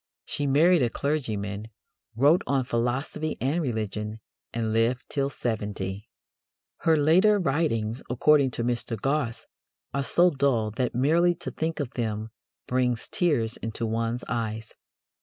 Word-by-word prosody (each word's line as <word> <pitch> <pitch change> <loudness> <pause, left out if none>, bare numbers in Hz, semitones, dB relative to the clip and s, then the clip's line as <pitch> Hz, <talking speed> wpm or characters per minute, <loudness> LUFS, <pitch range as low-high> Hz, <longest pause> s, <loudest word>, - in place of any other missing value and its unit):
She 145 - -1
married 165 +5 +5
a 120 - +2
clergyman, 110 -8 -2 0.5
wrote 145 - +5
on 135 -2 +2
philosophy 130 +6 -2
and 145 +7 0
religion, 110 -4 -3 0.3
and 110 -2 -2
lived 115 +3 +1
till 140 -1 0
seventy. 105 -5 -4 0.7
Her 160 -1 +3
later 180 +8 +5
writings, 135 - 0
according 140 +2 +4
to 115 - -1
Mr. 120 -2 -2
Gosse, 135 -2 -1 0.5
"are 140 - 0
so 175 +6 +4
dull 130 -7 +1
that 125 +3 -2
merely 165 +7 +3
to 170 - -6
think 160 +1 -3
of 140 -4 -3
them 110 -2 -3 0.3
brings 125 -2 0
tears 130 -10 0
into 115 +1 -4
one's 115 +2 -1
eyes." 110 -1 -3
125 Hz, 135 wpm, -26 LUFS, 115-150 Hz, 0.7 s, married